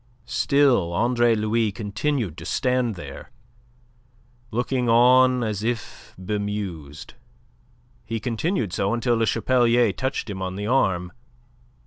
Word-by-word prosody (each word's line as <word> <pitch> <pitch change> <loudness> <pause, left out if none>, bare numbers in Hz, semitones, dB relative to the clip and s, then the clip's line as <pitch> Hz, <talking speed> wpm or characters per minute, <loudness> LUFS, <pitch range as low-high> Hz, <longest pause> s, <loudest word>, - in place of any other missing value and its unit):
Still 125 -9 +2
Andre 120 +3 +2
Louis 110 0 0
continued 105 - -2
to - - -9
stand 125 +3 0
there, 70 -6 -9 1.2
looking 120 +1 -1
on 125 +2 +5
as 105 -3 -2
if 115 +1 -5
bemused. 95 -6 -5 0.9
He 115 0 -4
continued 120 - -2
so 100 +4 0
until 120 0 +1
Le 115 -1 +1
Chapelier 120 -1 +2
touched 130 +1 -3
him 95 -3 -6
on 95 0 -4
the 105 +1 -4
arm. 95 -8 +1
115 Hz, 115 wpm, -23 LUFS, 100-125 Hz, 1.2 s, on